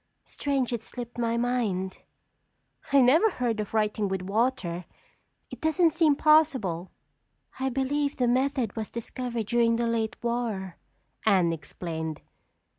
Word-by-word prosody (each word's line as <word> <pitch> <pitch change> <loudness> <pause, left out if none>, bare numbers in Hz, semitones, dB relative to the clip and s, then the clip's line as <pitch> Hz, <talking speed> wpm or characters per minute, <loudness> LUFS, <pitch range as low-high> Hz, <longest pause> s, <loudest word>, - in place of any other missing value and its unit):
Strange 270 -4 -1
it 235 - -2
slipped 240 +1 -8
my 230 0 +1
mind." 225 -7 -1 0.9
"I 280 -1 +6
never 310 - +5
heard 240 - -2
of 210 +1 -4
writing 210 -1 +1
with 190 -1 -2
water. 195 -4 -1 0.7
It - - -9
doesn't 315 +1 +3
seem 320 -3 +4
possible." 270 - +3 0.7
"I 265 0 0
believe 280 +2 -1
the 250 - +2
method 255 -2 +1
was 220 -2 -4
discovered 235 0 -4
during 230 +1 +3
the 235 +1 0
late 230 -1 -1
war," 230 -6 -2 0.5
Anne 185 -6 +3
explained. 160 0 -5
235 Hz, 130 wpm, -27 LUFS, 200-265 Hz, 0.9 s, I